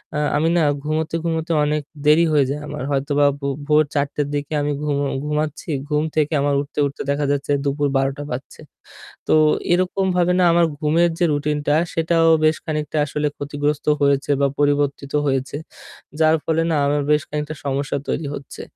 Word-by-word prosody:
আ - - 0 0.2
আমি 160 - +1
না - - +3 0.2
ঘুমোতে, 155 +2 -2
ঘুমোতে 165 0 -1
অনেক 150 0 0 0.2
দেরি 155 +3 +5
হয়ে 145 -3 +4
যায় 145 +1 -3
আমার। - - -5
হয়তোবা 145 +1 +1
ভো 140 - -3 0.2
ভোর 150 0 +5
০৪ঃ০০ 140 -1 +1
টের 145 -1 -1
দিকে 145 +2 -3
আমি 145 0 -1
ঘুম 150 -1 0 0.3
ঘুমাচ্ছি। 150 +1 -2 0.2
ঘুম 150 0 +1
থেকে 155 0 +1
আমার 140 0 +1
উঠতে, 145 - -7
উঠতে 140 0 -5
দেখা 145 +1 0
যাচ্ছে 145 0 -1
দুপুর 145 +1 0
১২ঃ০০ 135 +2 -1
বাজছে। 125 +2 -7 0.7
তো - - +3 0.4
এরকমভাবে 180 0 +1
না - - +4
আমার 170 0 +4
ঘুমের 165 +3 +2
যে 175 - +2
রুটিনটা, 145 0 0 0.2
সেটাও 165 0 +2 0.2
বেশ 155 0 +4
খানিকটা 155 -1 -3
আসলে 150 +1 -2
ক্ষতিগ্রস্ত 145 +1 -2 0.2
হয়েছে 140 0 +2
বা 140 - +4
পরিবর্তিত 145 -1 0
হয়েছে। 135 0 -1 0.6
যার 160 0 +5
ফলে 165 0 +1
না - - +2
আমার 145 0 +1
বেশ 150 0 +4
খানিকটা 150 +1 -4
সমস্যা 140 +1 -1
তৈরি 155 - -2
হচ্ছে। 135 - -9
150 Hz, 175 wpm, -21 LUFS, 145-155 Hz, 0.7 s, দেরি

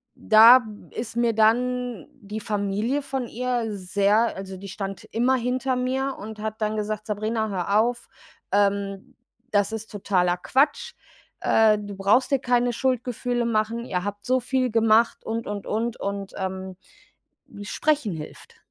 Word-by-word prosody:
da 230 +3 +7 0.3
ist 230 0 -6
mir 235 -1 +2
dann 245 -2 +1
die 215 -4 -7
Familie 210 +6 -1
von 265 -3 -3
ihr 245 -1 -2
sehr 200 +4 +1
also, 190 0 -7
die 200 +1 -9
stand 195 0 -6
immer 245 +4 +2
hinter 255 +2 -1
mir 265 +2 -1
und 215 +1 -8
hat 220 +1 -4
dann 215 0 0
gesagt: 215 0 -3
„Sabrina, 215 +1 -1
hör 200 +2 +1
auf, 240 +2 -1 0.4
ähm, 200 +4 0 0.4
das 205 +1 +2
ist 220 0 -6
totaler 180 -3 +1
Quatsch. 275 +9 +1 0.5
Äh, 215 -1 +4
du 205 -1 -7
brauchst 205 +8 +2
dir 275 - +3
keine 245 -1 +1
Schuldgefühle 245 -1 -1
machen. 230 +1 -1
Ihr 180 -4 -2
habt 205 0 -5
so 255 +1 +2
viel 255 -1 0
gemacht 225 0 +3
und, 225 +1 -3
und, 205 -1 -5
und, 225 +2 -2
und, 200 -1 -4
ähm, 190 -1 -5 0.7
hm, 205 - -10
Sprechen 285 - 0
hilft.“ 155 -1 -10
220 Hz, 150 wpm, -24 LUFS, 200-245 Hz, 0.7 s, da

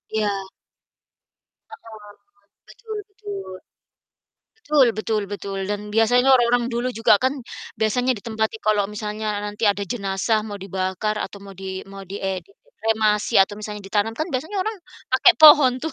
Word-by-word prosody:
Iya. 210 -1 +1 1.4
Heeh, 215 -2 -13 0.6
betul 440 -3 -8
betul. 405 - -8 1.1
Betul 295 -4 +4
betul 215 -1 -1
betul, 200 -1 -5
dan 205 0 -2
biasanya 245 +4 +4
orang-orang 240 -1 +3
dulu 240 +2 -1
juga 215 -2 +4
kan 260 +2 +1 0.4
biasanya 240 +4 +1
ditempati 220 +1 -3
kalau 210 -2 +2
misalnya 210 +1 -5 0.2
nanti 210 +1 0
ada 200 0 0
jenazah 200 +1 -1
mau 205 - -5
dibakar 190 +2 -3
atau - - -5
mau 195 - -10
di 190 0 -7
mau 195 0 -11
di, 195 - -6
eee, 190 -2 -3
di - - -29 0.2
dikremasi 220 - 0
atau 195 - -3
misalnya 210 -1 -7
ditanam, 205 +3 -1
kan 310 - -1
biasanya 315 +11 -3
orang 440 0 -3 0.4
pakai 305 +8 +6
pohon 295 -4 +8
tuh, 320 - -3
215 Hz, 145 wpm, -22 LUFS, 205-250 Hz, 1.4 s, pohon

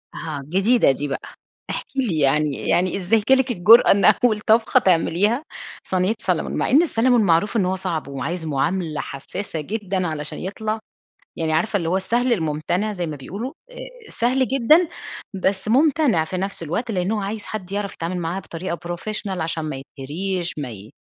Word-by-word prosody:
أها، 155 -3 -5
جديدة 200 - +4
دي 145 +2 -3
بقى. 140 - -3 0.5
احكي 390 - -4
لي 195 -12 0
يعني، 145 0 +1
يعني 185 +2 +2
إزاي 205 +4 +2
جالِك 265 -1 +4
الجُرأة 225 +3 +7
إن 200 0 +3
أول 220 -4 +4
طبخة 220 +1 +3
تعمليها 195 - +2 0.4
صينية 185 +4 0
سالمون، 180 -5 -1
مع - - 0
إن 285 +5 +6
السالمون 245 -7 +3
معروف 185 +5 +2
إن 195 - +2
هو 185 +1 0
صعب 180 -5 -3
وعايز 160 +5 -4
معاملة 155 +2 -1
حسّاسة 155 +4 -5
جدًا، 195 0 -2
علشان 150 -1 -5
يطلع 215 +3 -3 0.6
يعني 160 -1 -1
عارفة 175 +7 +1
اللي 170 -4 -1
هو 185 - +1
السهل 240 +6 +1
المُمتنع 175 +3 -1
زي 180 -4 -3
ما 155 -2 -5
بيقولوا، 200 - -6 0.2
آآ، - - -11
سهل 250 +1 +1
جدًا، 300 +7 +4 0.5
بس 190 +1 -1
مُمتنع 270 - +3
في 185 +2 -5
نفس 195 -1 -3
الوقت، 190 +10 -3
لأن 185 -1 -1
هو 215 - -1
عايز 205 +2 -4
حد 195 -3 -6
يعرف 205 -1 -2
يتعامل 170 +2 -4
معاه 175 +2 -3
بطريقة 170 -1 -5
professional 190 +2 -4
عشان 160 0 -2
ما 150 -3 -4
يتهريش 165 +7 -4
ما 140 -4 -4
ي 105 0 -10
190 Hz, 175 wpm, -22 LUFS, 165-220 Hz, 0.6 s, الجُرأة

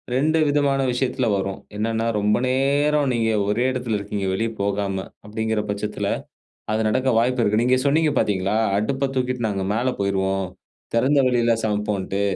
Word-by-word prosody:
2 155 +5 +2
விதமான 140 -1 +2
விஷயத்துல 125 0 0
வரும். 95 0 -2 0.2
என்னனா, 110 +1 -1
ரொம்ப 105 +1 +2
நேரம் 140 +2 +2
நீங்க 115 -2 +1 0.2
ஒரே 110 +5 +1
இடத்துல 125 -4 -2
இருக்கிறீங்க. 100 -1 -3
வெளியே 115 +4 -1
போகாம 100 -1 -1 0.2
அப்டீங்குற 110 0 -1
பட்சத்துல 105 +1 -2 0.6
அது 110 +1 +1
நடக்க 130 +5 +1
வாய்ப்பு 125 +1 +1
இருக்கு. 105 +1 +2
நீங்க 125 +1 +3
சொன்னீங்க 155 +2 +3
பாத்தீங்களா? 100 0 +1 0.2
அடுப்ப 135 +6 0
தூக்கிட்டு 125 -2 -1
நாங்க 100 -2 -2
மேல 120 +4 +1
போயிருவோம். 95 -1 0 0.5
திறந்த 135 +5 +3
வெளியில 120 -2 +2
சமைப்போம்னுட்டு. 105 -2 -1
115 Hz, 145 wpm, -22 LUFS, 100-130 Hz, 0.6 s, நீங்க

